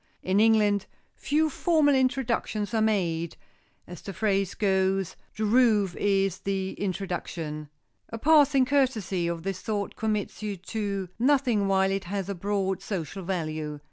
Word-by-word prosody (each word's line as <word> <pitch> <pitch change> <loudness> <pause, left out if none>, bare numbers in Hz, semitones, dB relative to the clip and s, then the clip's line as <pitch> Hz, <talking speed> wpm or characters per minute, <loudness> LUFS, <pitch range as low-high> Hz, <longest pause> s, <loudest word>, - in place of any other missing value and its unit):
In 190 +2 +2
England, 210 -2 +3 0.3
few 310 +3 +1
formal 310 -1 +2
introductions 255 -5 0
are 220 - +2
made,—as 175 -3 -3
the 195 - -7
phrase 195 -3 0
goes, 190 -2 +1 0.2
"the 215 - 0
roof 215 -5 +3
is 195 -2 +1
the 190 -1 -2
introduction." 175 -6 -4 0.4
A 230 - -5
passing 285 -1 +5
courtesy 225 -11 +1
of 170 -1 -3
this 195 -1 -3
sort 205 0 -3
commits 215 -2 -2
you 210 -2 -3
to 200 0 -3
nothing 250 -6 +2
while 190 0 +2
it 195 -1 -2
has 195 +1 -3
a - - -1
broad 195 0 -1
social 195 -2 -4
value. 155 -4 -3
200 Hz, 140 wpm, -27 LUFS, 190-220 Hz, 0.4 s, passing